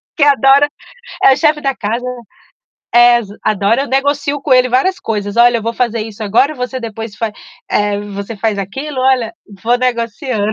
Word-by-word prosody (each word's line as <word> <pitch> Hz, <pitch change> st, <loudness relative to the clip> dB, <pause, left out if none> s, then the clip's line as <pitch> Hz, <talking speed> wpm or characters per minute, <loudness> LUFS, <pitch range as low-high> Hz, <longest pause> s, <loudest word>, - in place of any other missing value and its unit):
Que 300 Hz, -, +2 dB
adora 280 Hz, 0 st, +5 dB, 0.5 s
é 265 Hz, -, +7 dB
o -, -, -2 dB
chefe 300 Hz, 0 st, +2 dB
da 275 Hz, -2 st, -1 dB
casa. 230 Hz, +4 st, -3 dB, 0.9 s
Ex 240 Hz, -2 st, +5 dB, 0.2 s
adora 215 Hz, +5 st, +1 dB
eu -, -, -5 dB
negocio 285 Hz, +1 st, 0 dB
com 275 Hz, -, +1 dB
ele 255 Hz, 0 st, +5 dB
várias 370 Hz, +10 st, +1 dB
coisas: 205 Hz, -1 st, -3 dB
"Olha, 240 Hz, 0 st, +6 dB
eu 225 Hz, -, -4 dB
vou 230 Hz, +1 st, -2 dB
fazer 235 Hz, -1 st, -1 dB
isso 220 Hz, 0 st, -8 dB
agora, 235 Hz, +9 st, +2 dB
você 250 Hz, 0 st, -4 dB
depois 225 Hz, -2 st, -7 dB
fa 225 Hz, -2 st, -3 dB, 0.4 s
eh, 205 Hz, -1 st, +1 dB
você 205 Hz, +1 st, -7 dB
faz 210 Hz, -1 st, -1 dB
aquilo". 265 Hz, +9 st, -5 dB
Olha, 255 Hz, -4 st, +1 dB, 0.3 s
vou 240 Hz, +1 st, +3 dB
negociando. 235 Hz, -2 st, -1 dB
240 Hz, 175 wpm, -15 LUFS, 215-270 Hz, 0.9 s, é